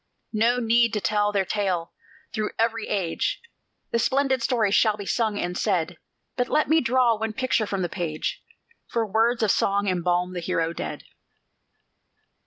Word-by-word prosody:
No 230 Hz, +3 st, +3 dB
need 235 Hz, 0 st, +3 dB
to 210 Hz, -, +1 dB
tell 210 Hz, 0 st, +1 dB
their 200 Hz, -2 st, +1 dB
tale: 185 Hz, -5 st, -1 dB, 0.4 s
through 215 Hz, -1 st, -1 dB
every 230 Hz, -1 st, 0 dB
age 190 Hz, -5 st, -1 dB, 0.5 s
The 235 Hz, -, +1 dB
splendid 265 Hz, +1 st, +1 dB
story 230 Hz, -4 st, +1 dB
shall 215 Hz, 0 st, +3 dB
be 200 Hz, -, -6 dB
sung 215 Hz, +1 st, 0 dB
and 175 Hz, -2 st, -2 dB
said; 180 Hz, -5 st, -1 dB, 0.4 s
But 245 Hz, -1 st, -1 dB
let 305 Hz, -, +2 dB
me 320 Hz, +1 st, +4 dB
draw 245 Hz, -1 st, +3 dB
one 220 Hz, 0 st, -2 dB
picture 255 Hz, -3 st, 0 dB
from 195 Hz, -2 st, -2 dB
the -, -, 0 dB
page 160 Hz, -3 st, -4 dB, 0.4 s
For 230 Hz, -1 st, -1 dB
words 225 Hz, +3 st, +1 dB
of 210 Hz, -, +4 dB
song 200 Hz, +1 st, +1 dB
embalm 180 Hz, 0 st, 0 dB
the 180 Hz, -, -3 dB
hero 165 Hz, -1 st, -1 dB
dead. -, -, -5 dB
210 Hz, 165 wpm, -25 LUFS, 185-235 Hz, 0.5 s, me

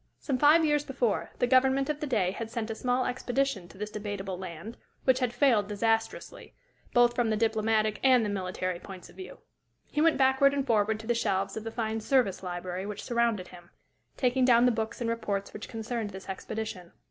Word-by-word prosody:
Some 265 Hz, -3 st, -2 dB
five 310 Hz, +3 st, +6 dB
years 295 Hz, -1 st, +2 dB
before, 260 Hz, -6 st, -1 dB
the -, -, +2 dB
government 265 Hz, +2 st, +3 dB
of 300 Hz, -1 st, -2 dB
the 300 Hz, -, -3 dB
day 200 Hz, -8 st, +1 dB
had 225 Hz, +3 st, -6 dB
sent 225 Hz, -1 st, -4 dB
a -, -, -1 dB
small 250 Hz, +2 st, 0 dB
expedition 250 Hz, -5 st, -1 dB
to 190 Hz, -, -16 dB
this 210 Hz, +1 st, -5 dB
Debatable 205 Hz, -3 st, -4 dB
Land, 185 Hz, +4 st, -8 dB, 0.3 s
which 260 Hz, -1 st, +3 dB
had 250 Hz, -3 st, 0 dB
failed 240 Hz, -5 st, +3 dB
disastrously, 225 Hz, -, -2 dB, 0.4 s
both 240 Hz, 0 st, +4 dB
from 240 Hz, -2 st, +1 dB
the 215 Hz, -, +1 dB
diplomatic 220 Hz, -1 st, +1 dB
and 255 Hz, -4 st, +5 dB
the -, -, -1 dB
military 185 Hz, -2 st, -3 dB
points 185 Hz, -2 st, -11 dB
of -, -, -21 dB
view. 375 Hz, -, -9 dB, 0.5 s
He 295 Hz, -, 0 dB
went 325 Hz, 0 st, +4 dB
backward 265 Hz, +1 st, +4 dB
and 275 Hz, -1 st, -1 dB
forward 215 Hz, -3 st, +1 dB
to -, -, -12 dB
the 240 Hz, -, +1 dB
shelves 195 Hz, -4 st, -1 dB
of 220 Hz, -, -5 dB
the 225 Hz, -, -4 dB
fine 220 Hz, -1 st, -2 dB
"Service" 235 Hz, -5 st, +1 dB
library 180 Hz, +1 st, -5 dB
which 210 Hz, -1 st, -6 dB
surrounded 235 Hz, -6 st, 0 dB
him, 175 Hz, -1 st, -14 dB, 0.5 s
taking 255 Hz, 0 st, +2 dB
down 240 Hz, -1 st, +5 dB
the 250 Hz, -, +5 dB
books 220 Hz, +1 st, -3 dB
and 235 Hz, -, -1 dB
reports 205 Hz, -4 st, -2 dB
which 210 Hz, -, -8 dB
concerned 225 Hz, -1 st, -4 dB
this 190 Hz, -1 st, -10 dB
expedition. 190 Hz, -2 st, -6 dB
225 Hz, 205 wpm, -29 LUFS, 205-255 Hz, 0.5 s, five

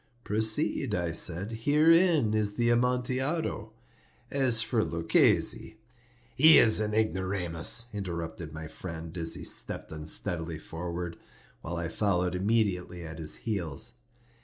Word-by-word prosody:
"Proceed," 110 Hz, +3 st, +2 dB
I 85 Hz, -2 st, -2 dB
said; 90 Hz, +5 st, -1 dB
"herein 150 Hz, +1 st, +3 dB
is 105 Hz, -1 st, 0 dB
the 120 Hz, +2 st, +1 dB
Amontillado. 125 Hz, +1 st, -1 dB, 0.6 s
As 130 Hz, -5 st, +4 dB
for 115 Hz, -4 st, 0 dB
Luchesi—" 85 Hz, +5 st, +1 dB, 0.6 s
"He 155 Hz, +6 st, +7 dB
is 110 Hz, -2 st, +6 dB
an 105 Hz, 0 st, -2 dB
ignoramus," 95 Hz, -2 st, +1 dB
interrupted 85 Hz, -5 st, -6 dB
my 80 Hz, +1 st, -8 dB
friend, 80 Hz, +1 st, -8 dB
as 80 Hz, -2 st, 0 dB
he -, -, -8 dB
stepped -, -, +2 dB
unsteadily 80 Hz, +1 st, -4 dB
forward, 85 Hz, +1 st, -6 dB, 0.4 s
while 85 Hz, +1 st, -6 dB
I 85 Hz, 0 st, -3 dB
followed 90 Hz, 0 st, -1 dB
immediately 90 Hz, -3 st, -1 dB
at 80 Hz, 0 st, -9 dB
his 80 Hz, -1 st, +1 dB
heels. 85 Hz, -, -3 dB
95 Hz, 120 wpm, -28 LUFS, 85-115 Hz, 0.6 s, He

